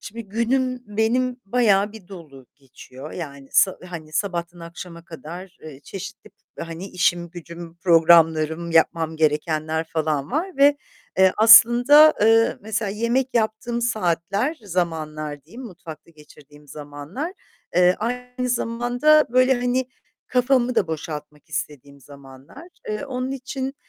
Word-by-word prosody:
şimdi 230 Hz, +2 st, -9 dB
günüm 250 Hz, +3 st, -1 dB
benim 240 Hz, +4 st, -1 dB
bayağı 210 Hz, -2 st, +2 dB
bir 205 Hz, -4 st, -14 dB
dolu 150 Hz, -9 st, -12 dB
geçiyor, 135 Hz, +1 st, -13 dB
yani, 140 Hz, -5 st, -8 dB
sa 190 Hz, -, +3 dB
hani, 155 Hz, -3 st, -9 dB
sabahtan 175 Hz, -2 st, -3 dB
akşama 170 Hz, 0 st, -10 dB
kadar, 170 Hz, +3 st, -10 dB
eee, 145 Hz, -3 st, -11 dB
çeşitli, 195 Hz, +6 st, -10 dB, 0.3 s
hani, 165 Hz, +3 st, -7 dB
işim 175 Hz, -1 st, 0 dB
gücüm, 170 Hz, -1 st, -10 dB
programlarım, 165 Hz, -1 st, +3 dB
yapmam 160 Hz, 0 st, +1 dB
gerekenler 155 Hz, +1 st, 0 dB
falan 155 Hz, -3 st, -1 dB
var 335 Hz, +5 st, -3 dB
ve 285 Hz, +1 st, +5 dB, 0.4 s
eee, 190 Hz, -1 st, +5 dB
aslında, 240 Hz, +7 st, +7 dB
eee, 225 Hz, +2 st, +4 dB
mesela 215 Hz, 0 st, -3 dB
yemek 235 Hz, +5 st, 0 dB
yaptığım 230 Hz, +1 st, -1 dB
saatler, 205 Hz, -, -1 dB
zamanlar 155 Hz, -5 st, -4 dB
diyeyim, 230 Hz, +11 st, -12 dB
mutfakta 170 Hz, -, -11 dB
geçirdiğim 150 Hz, -1 st, -18 dB
zamanlar, 150 Hz, -, -7 dB, 0.4 s
eee, 180 Hz, 0 st, +5 dB
aynı 250 Hz, +2 st, -4 dB
zamanda 245 Hz, +5 st, +2 dB
böyle, 255 Hz, +2 st, +4 dB
hani, 245 Hz, +1 st, -1 dB, 0.5 s
kafamı 250 Hz, 0 st, +2 dB
da 220 Hz, -6 st, +1 dB
boşaltmak 150 Hz, -1 st, -7 dB
istediğim 145 Hz, -4 st, -6 dB
zamanlar. 140 Hz, -, -14 dB, 0.2 s
Eee, 215 Hz, +6 st, -3 dB
onun 255 Hz, -1 st, -4 dB
için 270 Hz, 0 st, -5 dB
185 Hz, 125 wpm, -22 LUFS, 160-240 Hz, 0.5 s, aslında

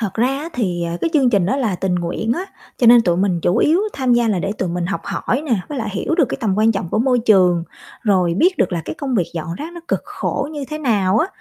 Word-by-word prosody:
Thật 215 Hz, -4 st, -3 dB
ra 235 Hz, +3 st, +2 dB
á, 285 Hz, +4 st, -3 dB
thì, 180 Hz, -8 st, -1 dB
à, 170 Hz, 0 st, -3 dB
cái 330 Hz, -, 0 dB
chương 270 Hz, -5 st, +3 dB
trình 195 Hz, -5 st, +2 dB
đó 265 Hz, -, 0 dB
là 225 Hz, -9 st, 0 dB
tình 190 Hz, -1 st, -1 dB
nguyện 175 Hz, +6 st, -1 dB
á, 360 Hz, -, -3 dB, 0.3 s
cho 245 Hz, -, +3 dB
nên 235 Hz, 0 st, +8 dB
tụi 175 Hz, -3 st, +1 dB
mình 185 Hz, -3 st, +1 dB
chủ 180 Hz, +6 st, +1 dB
yếu 325 Hz, +9 st, +3 dB
tham 260 Hz, -3 st, 0 dB
gia 240 Hz, -1 st, +2 dB
là 195 Hz, -4 st, +1 dB
để 195 Hz, +3 st, -2 dB
tụi 185 Hz, -4 st, -3 dB
mình 175 Hz, 0 st, -2 dB
học 195 Hz, -, -3 dB
hỏi 270 Hz, +4 st, -2 dB
nè, 240 Hz, -, +2 dB
với 290 Hz, -3 st, -4 dB
lại 220 Hz, -2 st, -3 dB
hiểu 200 Hz, +11 st, -1 dB
được 325 Hz, -4 st, +4 dB
cái -, -, -3 dB
tầm 205 Hz, -5 st, 0 dB
quan 220 Hz, +1 st, +4 dB
trọng 195 Hz, -5 st, -3 dB
của 215 Hz, -, 0 dB
môi 250 Hz, 0 st, +2 dB
trường, 185 Hz, -7 st, +3 dB, 0.4 s
rồi 185 Hz, -5 st, +2 dB
biết 360 Hz, -, +2 dB
được -, -, +1 dB
là 170 Hz, -2 st, -2 dB
cái -, -, -5 dB
công 275 Hz, -4 st, -3 dB
việc 180 Hz, -7 st, +1 dB
dọn 165 Hz, +1 st, -4 dB
rác 315 Hz, -, -7 dB
nó 345 Hz, -, -9 dB
cực -, -, 0 dB
khổ 285 Hz, 0 st, -3 dB
như 290 Hz, -2 st, -5 dB
thế 305 Hz, -, -4 dB
nào 210 Hz, -7 st, +1 dB
á 330 Hz, -, +2 dB
220 Hz, 290 wpm, -19 LUFS, 180-265 Hz, 0.4 s, nên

